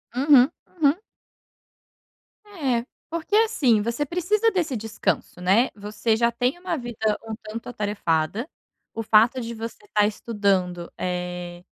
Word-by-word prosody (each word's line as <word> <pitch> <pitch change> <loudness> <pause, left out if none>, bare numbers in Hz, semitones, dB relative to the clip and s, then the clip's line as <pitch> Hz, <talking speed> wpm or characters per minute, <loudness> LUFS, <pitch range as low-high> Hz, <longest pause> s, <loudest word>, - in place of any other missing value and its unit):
Uhum, 270 0 +6 0.3
uhum. 290 +4 +4 1.5
É, 275 - -1 0.2
porque, 335 +5 -2
assim, 320 - +4
você 235 +6 -1
precisa 400 +8 +1
desse 330 -9 -1
descanso, 220 -4 -2
né, 200 +8 +4
você 210 +2 -1
já 235 +1 +2
tem 245 +6 0
uma 355 -2 -2
vida 225 -4 -1
um 220 - -4
tanto 220 +2 -7
atarefada, 205 - -1 0.4
o 225 - -3
fato 225 +4 +4
de 235 -1 -5
você 230 - -7
estar 210 - +2
estudando, 195 -5 -1
eh, 180 -1 -4
230 Hz, 125 wpm, -24 LUFS, 205-285 Hz, 1.5 s, Uhum